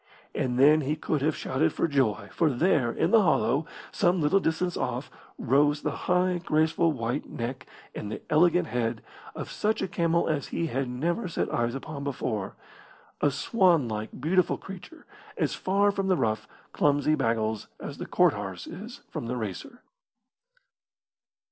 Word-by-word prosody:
And 125 -1 -1
then 150 +4 +6
he 145 +2 -1
could 155 -1 -2
have 155 +2 +1
shouted 155 +5 0
for - - +1
joy, 110 -9 0
for 165 - +2
there, 135 -3 +2
in - - 0
the 225 -2 +7
hollow, 145 - +2 0.2
some 180 -1 +2
little 160 +6 +3
distance 175 0 -1
off, 125 +2 -3 0.3
rose 145 +3 +2
the - - 0 0.2
high, 180 0 +2
graceful 160 0 +2
white 125 0 -3
neck 130 +3 -5 0.3
and 105 - -6
the - - -4
elegant 175 +2 +4
head 115 -2 -2 0.3
of - - -6
such 215 +1 0
a - - -1
camel 170 -1 +1
as 145 -4 -1
he 170 - -2
had 135 -4 -2
never 170 - -1
set 170 - -2
eyes 120 +1 0
upon 140 +1 -6
before 120 -7 -3 0.7
a 145 - +4
swanlike, 140 - +1
beautiful 175 +6 +2
creature, 195 - -11 0.3
as - - 0
far 200 +2 +2
from 195 -1 -2
the 185 -2 +3
rough, 110 -1 -1 0.3
clumsy 145 +1 +2
baggles 110 -5 0
as - - -7
the - - -5
cart - - +4
horse 95 -3 -6
is 215 +7 -9
from 115 - -5
the 125 +1 -2
racer. 110 - -6
150 Hz, 160 wpm, -27 LUFS, 120-175 Hz, 0.7 s, the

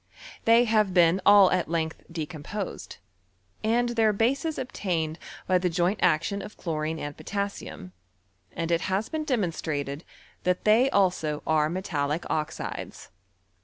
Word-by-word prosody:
They 230 +1 +6
have 215 -5 +2
been 175 +1 +5
all 200 -2 +8
at 175 - 0
length 165 -1 -2
decomposed, 165 +5 -6 0.7
and 240 +2 +2
their 225 -2 +3
bases 270 +9 0
obtained 170 -10 -2 0.3
by 185 -1 +3
the 180 0 0
joint 175 +4 0
action 200 +6 +2
of 215 - -10
chlorine 160 -1 -2
and 145 -2 -5
potas 200 0 -3
sium, 90 0 -9 0.6
and 170 0 -3
it 170 +1 +2
has 195 +5 -1
been 310 -1 -3
demonstrated, 160 - -2 0.4
that 180 0 0
they 225 +5 +5
also 180 - +1
are 155 -1 +2
metallic 160 -3 -2
oxides. 160 0 -4
180 Hz, 135 wpm, -27 LUFS, 160-215 Hz, 0.7 s, all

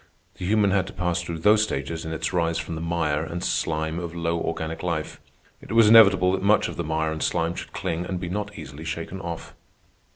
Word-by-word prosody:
The - - -4
human 105 -1 +3
had 95 -1 +1
to - - -9
pass 90 0 -1
through 85 -1 -5
those 105 +6 +4
stages 80 -5 -2
in 80 - -4
its 80 +2 -3
rise 85 -2 +1
from 85 - -4
the 80 - -4
mire 85 -3 0
and 85 +2 -5
slime 80 +1 -1
of 85 -1 -6
low 85 0 -1
organic 80 0 -3
life. 85 -3 -3 0.4
It - - -7
was 115 -2 +6
inevitable 100 -5 +7
that 95 0 -1
much 105 +1 +3
of - - -6
the 85 - -3
mire 80 0 -1
and 80 0 -5
slime 85 +1 0
should - - -7
cling 85 +2 -3
and 95 -2 -3
be 90 - -4
not 105 +3 -4
easily 75 -1 -9
shaken 85 +4 -5
off. 85 -2 -6
85 Hz, 225 wpm, -25 LUFS, 80-95 Hz, 0.4 s, inevitable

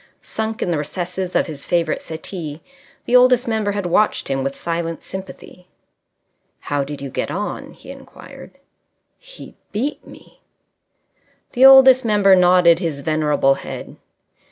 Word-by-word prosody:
Sunk 220 0 -4
in 175 - -2
the 160 - -1
recesses 180 +4 -5
of - - +2
his 150 -4 -9
favourite 170 -3 0
settee 160 -1 -7 0.4
the 245 - +1
Oldest 250 0 +4
Member 220 -3 -1
had 200 -2 -4
watched 195 +5 0
him 135 -1 -1
with 135 +1 -4
silent 165 -1 -4
sympathy. 190 -1 -10 0.9
"How 145 -1 -2
did 140 0 -8
you 135 - -6
get - - -3
on?" 205 +3 -5
he - - -13
inquired. - - -14 0.6
"He - - -13 0.2
beat 265 +8 -3
me." - - -17 1.1
The 255 +2 +4
Oldest 265 -1 +7
Member 205 -4 +4
nodded 180 -2 +4
his 160 -6 -4
venerable 150 -2 +1
head. - - -9
180 Hz, 140 wpm, -19 LUFS, 155-215 Hz, 1.1 s, Oldest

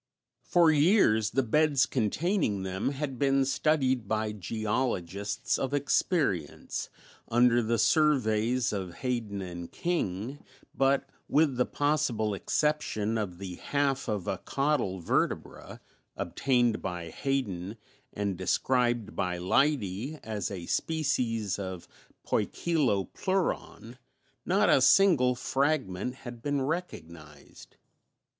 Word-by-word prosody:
For 170 -2 +4
years 145 - +4
the 135 +4 +1
beds 145 +2 +3
containing 130 - 0
them 95 +4 -2
had 135 -2 -4
been 135 -1 +3
studied 130 -5 +1
by 110 0 -1
geologists 105 -2 -2
of 135 +1 -1
experience, 140 - -1 0.4
under 120 0 +4
the 115 +1 0
surveys 125 -5 +2
of 95 -4 -4
Hayden 115 -5 -3
and 85 -1 -7
King, 135 - -3 0.3
but, 135 0 +2 0.2
with 150 -3 +3
the 125 0 +1
possible 145 -8 0
exception 115 -2 0
of 100 -6 -3
the 90 -2 -7
half 140 -2 -1
of 105 -5 -2
a - - -2
caudal 135 -10 -1
vertebra, - - -2 0.4
obtained 120 -4 +1
by 90 -3 -5
Hayden 105 - -2 0.3
and 100 -2 -2
described 120 +4 0
by 90 -1 -1
Leidy 125 - 0
as 110 -2 -3
a 90 -4 -6
species 115 - -1
of 95 -3 -6 0.4
Poikilopleuron, 145 - -1 0.5
not 200 +4 +3
a 135 - +5
single 135 -7 +5
fragment 130 -4 -1
had 120 -3 -10
been 145 +1 -1
recognized. 85 - -7
120 Hz, 110 wpm, -29 LUFS, 100-145 Hz, 0.5 s, a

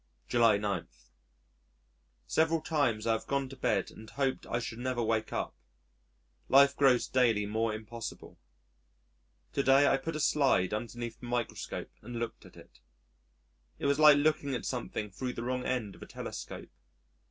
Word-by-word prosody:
July 115 -3 +4
9. 100 -4 -2 1.4
Several 160 - +2
times 145 -9 0
I 115 - +2
have 110 - -4
gone 140 -1 0
to 135 - -9
bed 100 -7 0
and 110 0 -12
hoped 135 -2 -2
I 120 - -1
should 115 -1 -5
never 125 -1 -1
wake 110 -1 0
up. - - -3 1.0
Life 140 +1 +6
grows 130 -4 +4
daily 115 -5 +2
more 110 +2 0
impossible. 110 +1 -8 1.1
To 140 - +1
day 135 +1 +5
I 135 - +4
put 155 +4 -5
a - - -2
slide 135 -12 +2
underneath 115 +1 -5
the 120 - -9
microscope 120 -1 -3
and 120 +3 -8
looked 115 -1 -5
at - - -18
it. - - -16 1.0
It - - -5
was 140 +1 +2
like 150 -2 +8
looking 145 -2 +1
at 120 - -5
something 115 -4 -4
thro' 125 +6 -4
the 115 - -5
wrong 125 +1 -2
end 115 -6 -2
of - - -17
a - - -9
telescope. - - -7
120 Hz, 165 wpm, -31 LUFS, 110-140 Hz, 1.4 s, like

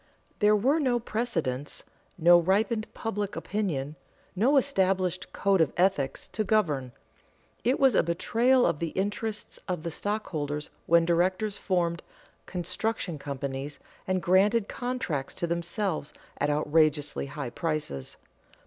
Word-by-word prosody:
There 210 0 +5
were 265 +10 +3
no 255 -5 +2
precedents, 165 - -2 0.3
no 175 +1 +7
ripened 215 +5 +1
public 210 -3 -3
opinion, 155 -9 -2 0.4
no 250 +9 +4
established 190 -8 +1
code 195 -3 +2
of 155 - +3
ethics, 175 -7 +1
to 215 - -1
govern. 155 - +1 0.7
It 255 +5 +2
was 270 -3 +5
a - - +5
betrayal 240 +9 +2
of 145 - +1
the 170 - -1
interests 205 +2 -3
of 180 -4 -2
the 170 - -3
stockholders 155 -7 -3 0.2
when 170 0 +5
directors 185 +5 +1
formed 170 -3 0 0.5
"construction 180 -1 -2
companies" 140 0 -4 0.3
and 185 -1 0
granted 200 +4 +4
contracts 245 - -3
to - - -1
themselves 170 -1 -2 0.3
at 145 - +1
outrageously 150 -1 +2
high 140 -3 -5
prices. 150 - -3
180 Hz, 125 wpm, -28 LUFS, 155-215 Hz, 0.7 s, no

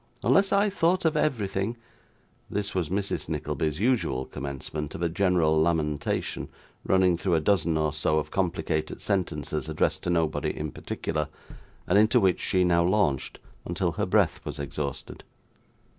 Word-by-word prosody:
Unless 195 0 +4
I 200 +1 +3
thought 185 -1 +1
of 160 -1 +2
everything 110 -6 0 0.4
' - - -36 0.3
This 100 0 -2
was 90 -5 -1
Mrs. 100 +2 -2
Nickleby's 75 0 -2
usual 110 - +1
commencement 70 +3 -5
of 85 - -4
a 85 - +2
general 85 -4 +2
lamentation, 80 -3 -1 0.3
running 95 -2 +3
through 90 0 +1
a - - +3
dozen 85 -2 +2
or 75 -1 0
so 75 0 +1
of 75 - -2
complicated 85 -4 -1
sentences 80 -5 -2
addressed 75 - 0
to - - -3
nobody 80 -3 0
in 75 -1 -3
particular, 75 -2 -3 0.6
and 95 +3 +4
into 110 +4 +5
which 95 -4 +2
she 90 -1 +2
now 85 -1 +3
launched 90 -7 +1 0.3
until - - -1
her - - -2
breath - - +2
was - - -5
exhausted. 70 0 -5
85 Hz, 155 wpm, -27 LUFS, 75-100 Hz, 0.6 s, into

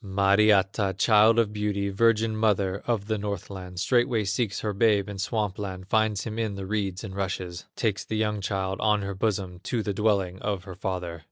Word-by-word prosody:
Mariatta, 100 0 +3
child 110 +2 +5
of 110 -3 +2
beauty, 105 -1 -1
Virgin 110 +2 +2
mother 100 -3 +1
of 115 -4 0
the 110 0 -1
Northland, 95 -2 -5
Straightway 120 +1 +2
seeks 100 0 -1
her 105 -1 -2
babe 105 -1 +3
in 100 -1 -7
Swamp 105 -1 -1
land, 95 -2 -5
Finds 110 -2 +2
him 110 0 -5
in 110 -3 -1
the 100 -1 -5
reeds 100 -2 -2
and 95 -3 -7
rushes; 90 -3 -4
Takes 110 -4 -1
the 110 - -3
young 105 -1 0
child 95 -1 -2
on 105 -2 +2
her 100 0 -3
bosom 95 -3 -2
To 115 +4 -2
the 105 - -2
dwelling 95 -3 +1
of 100 -3 -2
her 95 - -8
father. 90 -2 -4
100 Hz, 190 wpm, -26 LUFS, 95-110 Hz, -, child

